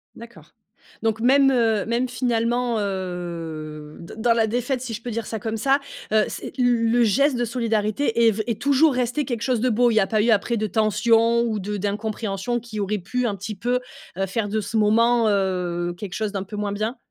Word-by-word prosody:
D'accord. 235 +1 -13 0.5
Donc 225 0 0
même, 270 +3 +5
heu, 225 -5 +2
même 240 +3 0
finalement, 240 -1 0
heu, 170 -6 -5
d 170 - -10
dans 230 +1 +3
la 225 -1 +2
défaite, 245 +3 -1
si 245 -3 -5
je 220 - -6
peux 240 0 -5
dire 230 0 -3
ça 220 - -4
comme 220 +1 -3
ça, 275 +5 +2 0.3
heu, 215 -1 +4
c'est - - -6
l 235 -2 +2
le 240 0 +4
geste 260 +5 +3
de 240 - 0
solidarité 230 0 +1
est 225 - +6
v 215 +1 -3
est 225 -2 -3
toujours 285 +1 +4
resté 250 +4 0
quelque 235 -2 -3
chose 245 -3 0
de 255 - +2
beau? 240 +1 +3
Il - - 0
y 215 - +5
a 195 - +1
pas 215 -2 +1
eu 230 - +1
après 225 +2 +2
de 215 0 -1
tension 225 +2 +3
ou 220 -3 -1
de 205 +2 -4
d'incompréhension? 210 +2 -2
Qui 220 -2 -7
auraient 210 +2 -1
pu, 250 +8 -2
un 210 -4 -1
petit 205 +2 -6
peu, 245 +5 0 0.4
heu, 195 - 0
faire 205 +2 -2
de 220 +1 0
ce 220 - -6
moment, 230 +2 +3
heu, 180 -3 -1
quelque 195 -2 -7
chose 215 -2 -2
d'un 195 -1 -2
peu 210 +2 -8
moins 205 -1 -2
bien? 215 +5 -3
225 Hz, 220 wpm, -23 LUFS, 205-240 Hz, 0.5 s, est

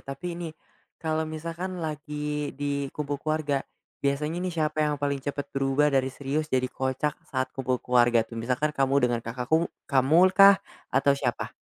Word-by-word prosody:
tapi 140 +6 -6
ini, 170 -1 -5 0.5
kalau 160 -1 -1
misalkan 165 +4 -5
lagi 150 -1 -4
di 140 -1 -2
kumpul 145 -1 -4
keluarga, 155 -3 0 0.4
biasanya 150 +4 -1
nih 185 - -1
siapa 155 0 0
yang 150 -1 +1
paling 140 -1 -1
cepat 145 +1 -4
berubah 135 +2 +2
dari 130 -1 +2
serius 140 +3 -3
jadi 130 -3 +1
kocak 130 +3 -1
saat 130 -1 -2
kumpul 130 -1 -1
keluarga 120 -2 +4
tuh? 115 0 -7
Misalkan 130 +6 0
kamu 135 -2 +1
dengan 120 -1 -1
kakak 125 +2 -5
ku 165 +2 +4 0.2
kamu 155 +8 +5
kah 195 0 +8 0.3
atau 135 +2 +3
siapa? 135 -4 -2
145 Hz, 165 wpm, -27 LUFS, 135-155 Hz, 0.5 s, kah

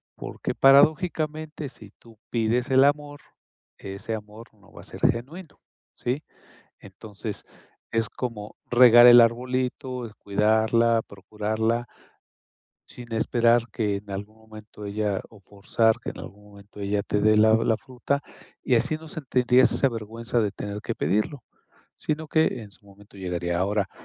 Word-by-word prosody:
porque, - - -6
paradójicamente, 155 +1 +2
si 105 -5 -15
tú 115 -2 -18
pides 120 +3 0
el 130 0 +6
amor, 145 0 -1 0.6
ese 100 +3 -6
amor 105 +2 -11
no 100 -2 -23
va - - -12
a - - -15
ser - - -10
genuino, 145 +8 -2 0.3
¿sí? 130 +5 -3 0.6
Entonces 105 +2 -9 0.5
es 115 -1 0
como 115 -4 -6 0.2
regar 120 -1 +8
el 120 0 +10
arbolito, 125 0 -1
cuidarla, 110 +3 +2
procurarla 110 +4 -2 1.0
sin 120 -1 -12
esperar 115 +1 +2
que 105 -3 -1
en 100 +1 -13
algún 100 +3 -7
momento 110 -1 -12
ella 100 -1 -2
o 105 -3 -18
forzar 105 +3 0
que - - -6
en - - -13
algún 105 +1 -12
momento 100 0 -15
ella 100 0 -1
te 105 - -1
dé 110 +1 +4
la 110 +1 +5
la 115 0 +1
fruta, 130 +4 -3 0.4
y 125 - +2
así 130 +7 +1
no 160 0 -13
sentirías 125 -4 +2
esa 135 - +2
vergüenza 115 +1 -3
de 105 -3 0
tener 100 +1 -6
que 115 - -4
pedirlo, 110 +6 -1 0.5
sino 155 +1 -3
que 155 -7 +1
en 105 -2 -12
su 100 - -17
momento 100 0 -18
llegaría, 90 -2 -3
ahora, 100 +1 0
115 Hz, 145 wpm, -25 LUFS, 105-125 Hz, 1.0 s, el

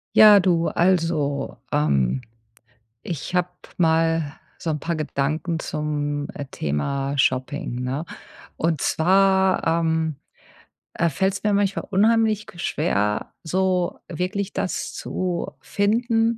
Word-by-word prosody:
Ja, 210 -2 +9
du. 170 -2 +2
Also, 165 -5 +1 0.2
ähm, 70 - +2 0.8
ich 170 +1 -5
habe 180 0 +1 0.3
mal 165 -2 +2 0.3
so 165 - -3
'n 150 -1 -2
paar 170 +2 -2
Gedanken 155 +2 -1
zum, 145 -1 -2
äh, 145 - -6
Thema 135 - -2
Shopping, 130 0 0
ne? 135 +6 -3 0.5
Und 160 -3 0
zwar, 190 +2 +3
ähm, 160 -2 +1 0.8
äh, 170 - +1
fällt's 190 +5 0
mir 210 -1 +2
manchmal 200 0 0
unheimlich 215 +1 +3
g 175 - -13
schwer, 105 - -1
so 180 +1 0
wirklich 185 +3 -3
das - - -3
zu 180 -2 -3
finden, 225 +2 +1
165 Hz, 115 wpm, -23 LUFS, 145-190 Hz, 0.8 s, Ja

